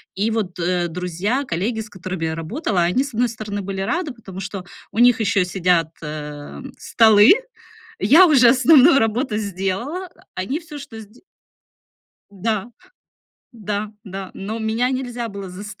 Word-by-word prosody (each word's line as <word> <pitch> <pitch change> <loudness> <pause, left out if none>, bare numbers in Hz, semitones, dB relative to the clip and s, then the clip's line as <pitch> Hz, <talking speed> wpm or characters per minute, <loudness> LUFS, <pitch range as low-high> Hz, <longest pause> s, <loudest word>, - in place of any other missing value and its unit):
И 210 +4 0
вот, 205 -6 -2
э, 175 0 0
друзья, 180 - -2
коллеги, 220 +1 -2
с 215 - -10
которыми 185 -3 -5
я 160 0 -2
работала, 180 - -2
они 180 +11 +2
с 280 - -8
одной 240 +2 +1
стороны 210 -2 -5
были 195 0 -4
рады, 310 - -2
потому 195 -5 -10
что 195 -1 -6 0.3
у 220 - -4
них 245 -1 +6
ещё 205 -3 +2
сидят, 180 -3 +1
а, 150 -1 -7 0.2
столы, 220 - +6 0.7
я 305 - +7
уже 255 -6 +6
основную 275 +3 +6
работу 225 +1 0
сделала. 205 - -3 0.3
Они 255 - -2
всё 305 -3 -10
что 225 -5 -10
сде 215 +3 -17 1.1
да, 215 +3 -2 0.8
да, 210 -1 -4
да 195 -1 -7
но 210 +4 -5
меня 225 +3 0
нельзя 245 -2 -3
было 200 -2 -7
заставить 205 +3 -9
210 Hz, 150 wpm, -21 LUFS, 185-245 Hz, 1.1 s, я